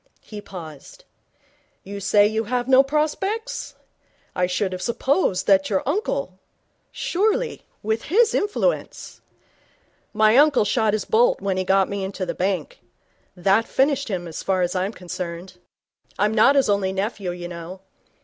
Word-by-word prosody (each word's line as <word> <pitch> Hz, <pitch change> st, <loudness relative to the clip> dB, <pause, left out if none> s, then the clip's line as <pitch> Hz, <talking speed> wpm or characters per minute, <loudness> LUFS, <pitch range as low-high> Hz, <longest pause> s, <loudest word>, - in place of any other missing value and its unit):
He 210 Hz, -1 st, -9 dB
paused. 160 Hz, -8 st, -11 dB, 0.8 s
'You 200 Hz, +1 st, -7 dB
say 205 Hz, +1 st, +4 dB
you 220 Hz, +1 st, 0 dB
have 245 Hz, +2 st, -2 dB
no 265 Hz, 0 st, +7 dB
prospects? 310 Hz, +10 st, -2 dB, 0.6 s
I 180 Hz, 0 st, +1 dB
should 185 Hz, +2 st, -1 dB
have 185 Hz, -, -5 dB
supposed 240 Hz, -, 0 dB
that 195 Hz, -1 st, +3 dB
your 195 Hz, -3 st, 0 dB
uncle? 350 Hz, +11 st, -2 dB, 0.5 s
Surely, 440 Hz, +6 st, -1 dB, 0.2 s
with 220 Hz, +2 st, -1 dB
his 445 Hz, +7 st, +3 dB
influence 420 Hz, +4 st, -2 dB, 0.5 s
?' -, -, -39 dB
'My 215 Hz, +2 st, +4 dB
uncle 290 Hz, -6 st, +5 dB
shot 220 Hz, 0 st, +1 dB
his 215 Hz, -, -1 dB
bolt 235 Hz, +3 st, +3 dB
when 195 Hz, -1 st, -2 dB
he 185 Hz, -, 0 dB
got 190 Hz, +1 st, +3 dB
me 200 Hz, -1 st, -4 dB
into 190 Hz, 0 st, -4 dB
the 175 Hz, -, -3 dB
bank. 195 Hz, -, -2 dB, 0.6 s
That 195 Hz, +5 st, +2 dB
finished 280 Hz, +1 st, +1 dB
him, 180 Hz, -5 st, -4 dB
as 160 Hz, -, -6 dB
far 185 Hz, -2 st, 0 dB
as 175 Hz, +1 st, -2 dB
I'm 185 Hz, +2 st, -1 dB
concerned. 180 Hz, -1 st, -7 dB, 0.6 s
I'm 210 Hz, +2 st, +1 dB
not 230 Hz, +6 st, +5 dB
his 275 Hz, -, +3 dB
only 200 Hz, -2 st, +1 dB
nephew, 195 Hz, -1 st, -3 dB
you 175 Hz, 0 st, -5 dB
know. 175 Hz, +2 st, -9 dB
205 Hz, 155 wpm, -22 LUFS, 185-265 Hz, 0.8 s, no